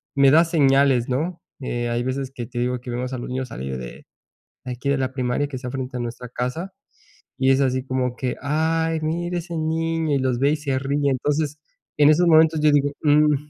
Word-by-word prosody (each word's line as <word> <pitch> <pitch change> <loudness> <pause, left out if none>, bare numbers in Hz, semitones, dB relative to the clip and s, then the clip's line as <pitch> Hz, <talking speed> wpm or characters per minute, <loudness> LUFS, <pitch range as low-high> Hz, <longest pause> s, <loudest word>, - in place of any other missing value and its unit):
me 140 -1 +5
da 160 +3 +7
señales, 135 -6 +3
¿no? 165 +7 -2 0.2
Eh, 120 -2 -2
hay 120 0 -1
veces 130 +1 -3
que 120 - -5
te 125 - -9
digo 125 +1 -1
que 125 - -9
vemos 125 +2 -3
a - - -2
los 120 - -6
niños 130 -1 -3
salir 65 -9 -5
de 60 -1 -9 0.6
de 125 - -4
aquí 130 +3 -5
de 140 - +1
la 130 0 -1
primaria 130 +2 -1
que 135 - -6
está 125 -1 -6
frente 130 -1 -5
a - - -4
nuestra 120 +1 -6
casa, 125 +11 -4 0.7
y 130 0 +3
es 135 +1 +3
así 130 0 0
como 130 -1 -1
que, 125 -1 -3
ay, 160 +2 0
mira 175 +3 -2
ese 170 0 -7
niño, 160 -1 0
y - - +1
los 130 -2 0
ve 140 +2 +3
y - - -1
se 140 -3 -1
ríe. 140 +1 0
Entonces, 150 +3 -1 0.4
en 150 0 +6
esos 175 +3 +4
momentos 160 -1 +5
yo 150 -1 +5
digo, 145 0 +2
mm, 150 0 +4
135 Hz, 220 wpm, -22 LUFS, 125-155 Hz, 0.7 s, da